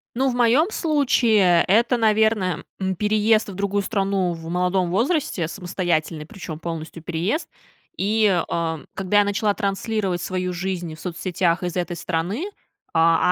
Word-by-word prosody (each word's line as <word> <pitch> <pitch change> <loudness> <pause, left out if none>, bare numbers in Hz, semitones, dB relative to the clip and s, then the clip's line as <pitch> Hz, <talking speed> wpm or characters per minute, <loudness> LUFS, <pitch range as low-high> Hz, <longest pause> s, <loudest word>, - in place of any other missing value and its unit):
Ну, 265 +2 +2
в 245 - -2
моем 245 - +4
случае, 235 - +3
это, 235 +4 +3
наверно, 220 -4 +2 0.2
м, 190 -1 -1
переезд 215 +2 +2
в 195 - -7
другую 200 +1 -1
страну 195 -3 0
в 165 0 -8
молодом 180 +1 +1
возрасте, 230 - 0
самостоятельный, 170 -3 -2
причем 160 -2 -8
полностью 165 -1 -6
переезд. 175 - -1 0.5
И, 215 +2 +2 0.2
а, 165 -1 -1
когда 195 +2 +2
я - - +5
начала 205 +1 +1
транслировать 200 -2 -1
свою 185 0 -2
жизнь 175 -2 -3
в - - -17
соцсетях 175 0 -1
из 175 -2 -3
этой 175 -1 -2
страны. 180 - -2 0.5
А, 165 +2 +4
190 Hz, 145 wpm, -22 LUFS, 175-215 Hz, 0.5 s, я